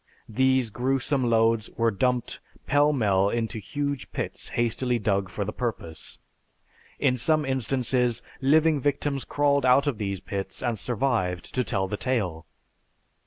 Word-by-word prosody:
These 130 0 +2
gruesome 130 +1 0
loads 115 -1 +2
were 115 0 +2
dumped 125 +3 -1 0.3
pell 145 +1 +3
mell 100 -7 +2
into 115 0 -2
huge 140 +7 -4
pits - - -5
hastily 120 +1 0
dug 100 -3 0
for 100 +3 -3
the 105 - -4
purpose. 110 -10 -5 0.8
In 135 -3 +2
some 155 +5 +2
instances, 125 -2 0 0.2
living 155 +2 +4
victims 140 0 -1
crawled 140 -1 +1
out 130 +2 +5
of 135 -7 -1
these 100 -2 -2
pits 100 +5 -5
and 120 -4 -1
survived 110 -5 -1
to 130 - +1
tell 95 -3 -1
the 105 - -3
tale. 100 - -2
120 Hz, 140 wpm, -26 LUFS, 105-135 Hz, 0.8 s, out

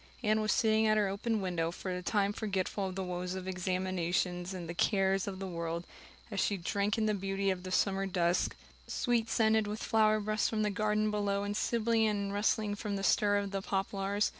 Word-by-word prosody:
Anne 215 0 +3
was 215 - +1
sitting 220 0 +3
at 215 0 +4
her 210 -1 +3
open 210 +3 -1
window, 175 -3 -1
for 185 +2 -5
the 180 - -3
time 200 +2 +1
forgetful 200 -2 -2
of 185 - -6
the 190 - -2
woes 180 0 -3
of 185 0 -6
examinations 180 -1 -1
and 180 -3 -6
the 170 - -4
cares 195 +1 +2
of 195 -1 -4
the 195 - -5
world, 170 -1 -4 0.5
as 200 - -2
she 200 - +1
drank 200 +4 0
in 220 - +1
the 215 - +2
beauty 195 0 0
of 185 -1 -3
the 185 - -7
summer 195 +1 +1
dusk, 175 -2 +1 0.3
sweet 235 -2 0
scented 220 -1 +3
with 210 +1 -4
flower 215 -1 +3
breaths 215 0 0
from 215 -1 0
the 210 - +1
garden 210 +1 +1
below 200 -1 0
and 205 0 -2
sibilant 225 0 +2
and 200 -1 -2
rustling 210 0 +1
from 205 0 -3
the 195 - -3
stir 205 0 +3
of 200 -1 -2
poplars. 195 +1 0
200 Hz, 210 wpm, -32 LUFS, 185-215 Hz, 0.5 s, at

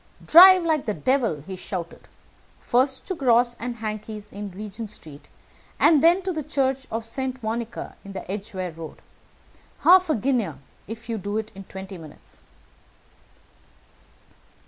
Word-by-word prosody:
'Drive 370 +2 +9
like 315 -6 0
the 210 - 0
devil!' 240 - 0
he 190 - -6
shouted, 180 -2 -7 0.5
'first 260 +2 +1
to 380 - -3
Gross 245 -6 +3
& - - -25 0.2
Hankey's 215 -1 -6
in 205 0 -6
Regent 210 +3 -7
Street, 155 -8 -9 0.5
and 310 -3 +5
then 350 +3 +5
to 370 0 -2
the 315 - -3
Church 270 -2 -1
of 225 0 -4
St. 260 +1 -4
Monica 230 +1 -4
in 195 - -10
the 190 -1 -6
Edgeware 195 -3 -4
Road. 160 -1 -9 0.8
Half 365 0 +6
a 310 - +3
guinea 235 - 0 0.3
if 225 +2 -8
you 225 -2 -3
do 205 +3 -3
it 220 0 -4
in 195 0 -10
twenty 190 -1 -9
minutes!' 145 - -13
225 Hz, 145 wpm, -24 LUFS, 195-265 Hz, 0.8 s, Drive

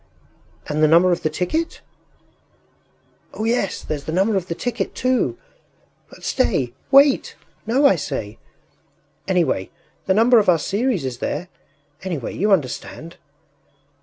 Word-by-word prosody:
” - - -36 0.2
“And 150 +1 -1
the 155 - +6
number 170 +4 +5
of 175 - 0
the 155 - 0
ticket?” 185 - -2 1.5
“Oh, 215 - -4
yes! 225 -3 -1
There’s 145 -2 -5
the 155 - -4
number 195 +5 +1
of 185 -2 -1
the 170 - -3
ticket 245 +5 -3
too. 250 - 0 0.7
But - - -16
stay... 120 -2 0 0.2
wait! 275 0 +4 0.3
No, 260 +6 +3
I 280 - +5
say! - - -5 0.9
Anyway, 175 - 0 0.4
the 190 - +3
number 230 +2 +6
of 205 - +2
our 175 - +5
series 200 - -1
is 125 -2 -5
there! 170 +7 -3 0.5
Anyway, 170 -10 -4
you 210 +3 +1
understand.... 165 0 -2
185 Hz, 140 wpm, -21 LUFS, 155-230 Hz, 1.5 s, the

